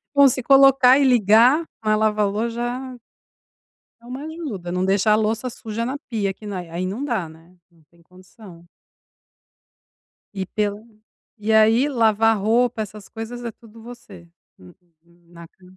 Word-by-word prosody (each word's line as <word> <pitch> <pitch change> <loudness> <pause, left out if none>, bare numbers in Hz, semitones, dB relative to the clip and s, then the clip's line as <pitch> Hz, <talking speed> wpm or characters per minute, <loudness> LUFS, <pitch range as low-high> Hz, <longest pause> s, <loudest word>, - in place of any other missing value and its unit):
Bom, 280 0 +7
se 255 0 -1
colocar 270 -1 +5
e 280 - +3
ligar, 245 - +4 0.2
a 215 -1 +1
lava-lo 215 +1 0
já 245 +2 -5 1.0
é - - -20
uma 255 +4 -8
ajuda. 280 - -7
Não 180 +1 -1
deixa 200 +2 +2
a 210 - +5
louça 220 +3 -1
suja 230 0 -6
na 265 +3 -4
pia 205 -4 -2
que 210 - -15
na 200 -3 -5
aí 175 +1 -5
não 210 +9 -5
dá, 230 - -2
né? 165 +3 -19 0.2
Não 165 -2 -27
tem 170 0 -26
condição. 180 0 -17 1.7
E 190 -1 -3
pela 210 +1 -3 0.6
e 215 +1 -2
aí 225 +5 +4
lavar 225 -4 +2
roupa 230 +3 0
essas 210 -1 -9
coisas 240 +2 -8
é 235 - -5
tudo 225 0 -18
você? 215 -7 -13 0.3
Uhum, 90 -1 -17 0.6
na 170 -1 -13
ca 185 - -30
220 Hz, 155 wpm, -21 LUFS, 195-245 Hz, 1.7 s, Bom